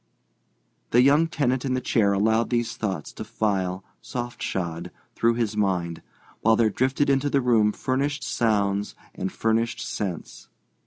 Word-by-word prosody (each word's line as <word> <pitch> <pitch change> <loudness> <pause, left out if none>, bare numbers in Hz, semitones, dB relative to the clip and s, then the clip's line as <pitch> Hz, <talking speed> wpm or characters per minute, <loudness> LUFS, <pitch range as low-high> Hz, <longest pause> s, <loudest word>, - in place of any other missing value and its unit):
The 120 +1 +5
young 145 +5 +5
tenant 130 -6 0
in 130 -1 0
the - - +1
chair 110 -5 +2
allowed 110 +3 +2
these 120 -1 -1
thoughts 95 -9 -4
to - - -6
file, 95 -3 -1 0.2
soft 120 -1 -6
shod, 85 -3 -3 0.2
through 115 0 +2
his 115 -3 -1
mind, 90 -5 -1 0.4
while 115 +1 +4
there 110 -1 +3
drifted 130 +6 +1
into 140 +1 +2
the 140 - +2
room 115 -4 +3
furnished 140 +5 -1
sounds 105 -6 0 0.2
and 95 - -4
furnished 115 +1 0
scents. 95 -6 -5
115 Hz, 150 wpm, -25 LUFS, 100-130 Hz, 0.4 s, The